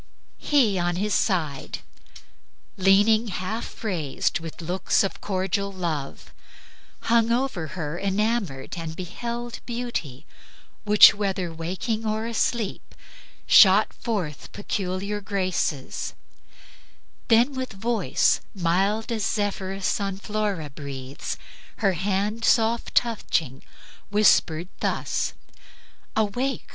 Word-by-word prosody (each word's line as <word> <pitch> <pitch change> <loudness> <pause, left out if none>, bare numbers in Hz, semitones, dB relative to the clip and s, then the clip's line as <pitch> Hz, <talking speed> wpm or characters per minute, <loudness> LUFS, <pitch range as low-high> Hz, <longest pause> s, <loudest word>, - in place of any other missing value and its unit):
"... - - -38
He 235 -10 +3
on 175 0 0
his 205 +3 -1
side 155 -9 -1 0.9
Leaning 205 +4 +4
half 210 +5 -5
raised, 165 -10 -1
with 165 -1 -8
looks 175 +4 +1
of 195 - -3
cordial 195 +1 -1
love, 165 -7 -4 0.7
Hung 230 0 +3
over 235 -9 0
her 160 0 -3
enamored, 200 - -1
and 160 -1 -5
beheld 235 +7 -5
Beauty 235 - -4 0.6
which, 210 0 +9
whether 190 -4 -2
waking 190 +7 -3
or 220 0 -1
asleep, 230 -2 -2 0.5
Shot 200 +1 +7
forth 185 -11 -4
peculiar 200 0 -3
graces; 185 -8 -2 1.1
then 235 +4 +4
with 260 -3 -4
voice, 220 0 +1
Mild 195 +6 +1
as 225 -2 -1
when - - 0
Zephyrus 195 0 -2
on 195 -1 -2
Flora 205 -7 -2
breathes, 135 -2 -6 0.4
Her 195 -3 +1
hand 200 +5 -1
soft 230 +1 +2
touching, 165 - 0 0.5
whispered 185 -5 +3
thus: - - -1 0.8
'Awake! 245 +5 -1
195 Hz, 105 wpm, -25 LUFS, 175-220 Hz, 1.1 s, which